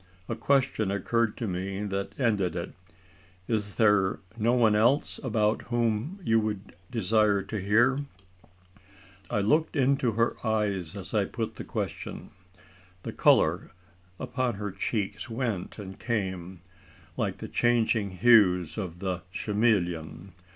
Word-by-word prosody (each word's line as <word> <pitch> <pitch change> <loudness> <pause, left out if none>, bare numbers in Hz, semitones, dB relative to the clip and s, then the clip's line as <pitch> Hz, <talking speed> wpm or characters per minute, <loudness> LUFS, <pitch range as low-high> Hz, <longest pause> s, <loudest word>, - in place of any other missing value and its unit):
A - - -2
question 130 -7 +1
occurred 110 +3 0
to 115 - -3
me 95 +2 -3
that 100 +1 -4
ended 100 - +1
it. 85 - -4 0.7
"Is 105 -3 -1
there 105 -4 +3 0.2
no 115 +1 +1
one 115 -4 +4
else 120 +7 +2
about 110 -4 +1
whom 120 - -1
you 115 -6 +3
would 105 -2 -4 0.2
desire 105 -2 +2
to 110 +2 -4
hear?" 120 +7 +3 1.3
I 105 - 0
looked 155 +12 +2
into 135 -3 +2
her 115 +2 +1
eyes 105 -7 -1
as - - -8
I - - +2
put - - -5
the - - -5
question. - - -5 0.7
The - - -5
colour - - +3 0.5
upon 125 -3 -1
her 105 0 -4
cheeks 100 +4 -3
went 115 -6 -3
and 95 -2 -9
came, 95 -6 -3 0.5
like - - -2
the - - -7
changing 115 -3 +2
hues 90 -3 +4
of 90 -3 -6
the 95 -2 -2
chameleon. 95 -5 -1
105 Hz, 130 wpm, -28 LUFS, 95-115 Hz, 1.3 s, one